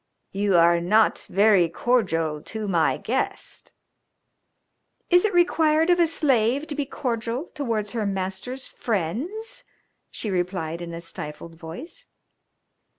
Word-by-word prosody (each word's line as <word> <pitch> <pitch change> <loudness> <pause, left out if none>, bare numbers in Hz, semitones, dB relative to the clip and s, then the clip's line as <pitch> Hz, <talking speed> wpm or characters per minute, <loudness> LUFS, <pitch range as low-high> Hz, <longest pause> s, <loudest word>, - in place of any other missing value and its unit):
"You 200 -2 +2
are 170 0 +5
not 210 +5 +2
very 195 -3 +4
cordial 165 -9 0
to 220 +4 -6
my 170 -4 +2
guest." - - -3 1.4
"Is 355 +3 +6
it 425 - +1
required 325 -2 +3
of 350 - +3
a 340 - +5
slave 275 -3 +2
to - - -3
be 290 -1 -2
cordial 245 +2 -3
towards 225 -8 -2
her 220 -3 -1
master's 195 +7 -4
friends?" 240 - -3 0.5
she 215 - -4
replied 175 -2 -2
in 170 -1 -6
a 170 - -7
stifled 165 -1 -7
voice. 175 - -10
215 Hz, 125 wpm, -24 LUFS, 175-285 Hz, 1.4 s, Is